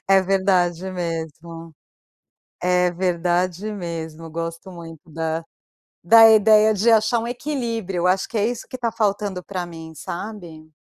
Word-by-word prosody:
É 195 0 +6
verdade 185 -2 +1
mesmo. 165 -2 -6 0.9
É 180 0 +2
verdade 180 +2 -1
mesmo, 165 -4 -6
gosto 165 +2 -6
muito 165 -2 -12
da, 160 +1 -3 0.6
da 225 +5 +8
ideia 215 0 +5
de 215 +3 +2
achar 220 +1 +3
um 230 - -4
equilíbrio, 230 - -3
acho 190 +1 +1
que 230 - -3
é 210 +1 +2
isso 240 0 -5
que - - -7
está 240 -2 -2
faltando 205 -4 -1
para 185 -2 -5
mim, 165 -2 -10
sabe. 170 -2 -8
180 Hz, 140 wpm, -22 LUFS, 165-210 Hz, 0.9 s, da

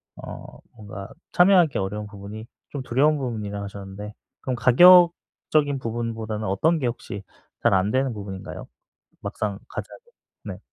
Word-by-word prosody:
어 - - -10 0.2
뭔가 100 -2 -9 0.2
참여하기 180 -4 +5
어려운 105 +2 -3
부분이 100 +2 -9 0.2
좀 140 -2 -5
두려운 145 +5 +2
부분이라고 105 -6 -4
하셨는데 100 +1 -8 0.3
그럼 130 -1 -2
가격적인 155 0 +5
부분보다는 115 -2 -4
어떤 155 - +2
게 130 - 0
혹시 115 -3 -5 0.4
잘 - - +3
안 95 +2 +2
되는 130 0 +1
부분인가요? 100 -3 -7 0.5
막상 100 -2 -3
가자면 - - -7 0.5
네. - - -6
110 Hz, 320 characters per minute, -24 LUFS, 100-135 Hz, 0.5 s, 참여하기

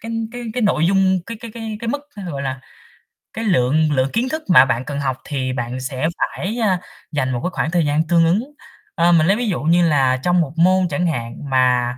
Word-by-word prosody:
cái 225 +1 -6 0.2
cái 245 0 -6
cái 245 - -2
nội 165 -6 +2
dung 190 0 +2
cái 230 - -6
cái 235 -2 -8
cái 225 -2 -5
cái 230 - -4
mức, 285 +4 -1 0.2
thế 200 - -7
rồi 145 -7 -5
là 130 -1 -4 0.7
cái 225 +1 -4
lượng 155 -3 +2
lượng 130 -1 +1
kiến 245 +3 0
thức 315 +3 -4
mà 130 -7 +8
bạn 125 -2 -1
cần 145 -1 -4
học 130 -2 -1
thì 130 -3 -3
bạn 125 0 -4
sẽ 130 +3 -2
phải, 210 +6 -3
a, 190 -5 +2 0.3
dành 130 -4 -1
một 120 - -1
cái 180 - 0
khoảng 160 - -1
thời 170 -3 +2
gian 150 +2 +1
tương 170 0 +4
ứng. 185 +7 +2 0.5
Ơ, 170 +1 +3
mình 165 -2 +4
lấy 195 - +4
ví 240 -1 -2
dụ 190 - -1
như 170 +2 +3
là 130 -4 +2
trong 175 0 +3
1 150 -3 -3
môn 185 +2 +4
chẳng 170 +4 0
hạn 120 -7 -3
mà 125 -1 +2
165 Hz, 240 wpm, -20 LUFS, 130-190 Hz, 0.7 s, mà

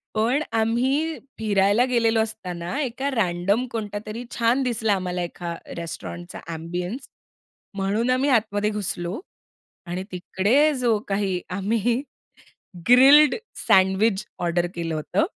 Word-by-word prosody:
पण 245 +7 +2
आम्ही 265 +8 +1 0.2
फिरायला 205 +2 +3
गेलेलो 230 -3 +2
असताना 185 0 -4
एका 265 +2 -2
रँडम 200 +2 +1
कोणता 210 -2 -4
तरी 220 +3 -6
छान 235 +3 +2
दिसला 225 -4 +1
आम्हाला 180 -2 -2
एका 175 0 -5 0.2
रेस्टॉरंटचा 170 +1 -7
एम्बियन्स 175 - -5 0.7
म्हणून 205 +5 0
आम्ही 260 +3 +2
आतमध्ये 210 -4 +2
घुसलो 195 -2 -3 0.7
आणि 180 +2 -3
तिकडे 210 +11 +2
जो 240 -4 +2
काही 195 -2 -1
आम्ही 225 +6 0 0.9
ग्रिल्ड 275 +4 +8 0.3
सँडविच 190 +2 +3
ऑर्डर 175 0 0
केलं 165 -2 -3
होतं, 155 - 0
210 Hz, 115 wpm, -24 LUFS, 180-245 Hz, 0.9 s, ग्रिल्ड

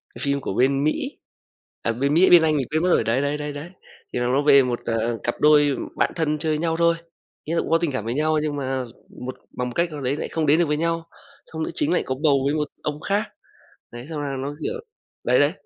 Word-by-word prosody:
cái - - -9
phim 140 0 0
của - - -3
bên 135 +5 +2
Mỹ, 265 - -1 0.6
à, 115 - 0
bên 140 +5 0
Mỹ, 175 +4 +5
bên 175 -2 +8
Anh 155 -2 +2
mình 130 - -1
quên 155 +2 +1
mất 180 - +2
rồi, - - +4
đấy, 115 +4 +1
đấy, 145 +1 -1
đấy, 150 0 -4
đấy. 150 +4 -8 0.4
Thì - - -1
nó 120 0 0
nói 140 - +2
về 140 -1 +8
một, 125 -2 -2
à, 115 - -1 0.3
cặp 120 - -1
đôi 145 -2 +5 0.2
bạn - - +1
thân 155 -2 0
chơi 160 0 0
với 150 - 0
nhau 165 0 0
thôi, 170 0 +3 0.5
ý 160 - -4
là 170 - +2
cũng - - -6
có 165 - +5
tình 165 -3 -1
cảm 130 -5 -3
với 115 - -1
nhau 155 +2 +1
nhưng 150 -1 -2
mà 135 -2 -2 0.4
một 130 - -5 0.2
bằng 125 0 -1
một - - -8
cách 170 0 +1
nào 150 -2 -6
đấy 130 +2 0
lại - - -4
không 160 -1 -1
đến 150 +3 +4
được 175 - +4
với 150 0 0
nhau. 165 +1 0 0.4
Xong 160 0 -5
nữ - - -3
chính 300 - 0
lại - - +2
có 130 - -2
bầu 145 -3 +5
với 140 - +1
một 150 -1 0 0.2
ông 150 0 -3
khác, 205 +2 +2 0.7
đấy, 120 +2 -8
xong 155 -2 -4
là 140 -1 -3
nó, 140 +2 -4
kiểu 470 +1 -2 0.4
đấy, - - +3
đấy, - - +4
150 Hz, 270 wpm, -23 LUFS, 135-160 Hz, 0.7 s, bên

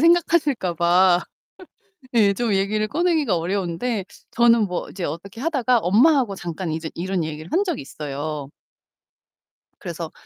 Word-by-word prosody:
생각하실까 305 - +3
봐. 175 +2 +4 0.9
예, 205 -4 +4
좀 225 +1 -1
얘기를 210 +2 0
꺼내기가 315 - +1
어려운데, 190 +4 -2 0.3
저는 235 -2 +4
뭐 180 -1 -4
이제 185 - -7
어떻게 200 +8 -6
하다가 260 -6 +2
엄마하고 230 - +3
잠깐 170 -1 -5
이제 160 0 -4
이런 180 0 -2
얘기를 155 +1 -7
한 380 +5 +2
적이 350 -8 -3
있어요. 145 0 -5 1.3
그래서 - - -6
195 Hz, 305 characters per minute, -22 LUFS, 170-250 Hz, 1.3 s, 봐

